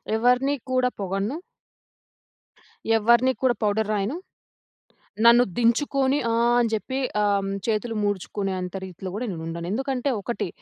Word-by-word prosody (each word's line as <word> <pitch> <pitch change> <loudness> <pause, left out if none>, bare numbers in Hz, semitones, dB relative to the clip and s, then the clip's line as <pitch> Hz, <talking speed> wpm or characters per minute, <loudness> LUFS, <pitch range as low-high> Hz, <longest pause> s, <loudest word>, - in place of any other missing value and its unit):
ఎవరిని 250 +5 +2 0.2
కూడా 255 -1 +2
పొగడను. 195 - -2 1.6
ఎవ్వరిని 235 +4 +4
కూడా 250 -2 +3
పౌడర్ 210 +1 +1
రాయను. 210 +6 -1 1.1
నన్ను 235 +1 +7
దించుకొని 265 +3 +2
ఆహ్, 235 +1 +3
అని 240 -1 +3
జెప్పి 260 +5 -2 0.2
అమ్ 200 -1 +1 0.2
చేతులు 225 +1 -1
ముడుచుకునే 205 0 -2
అంత 180 0 -6
రీతిలో 185 0 -8
గూడా 235 +4 -3
నేను 165 -4 -6
ఉండను. 170 +1 -5
ఎందుకంటే 265 +3 -1
ఒకటి, 210 -2 -3
230 Hz, 125 wpm, -24 LUFS, 200-250 Hz, 1.6 s, నన్ను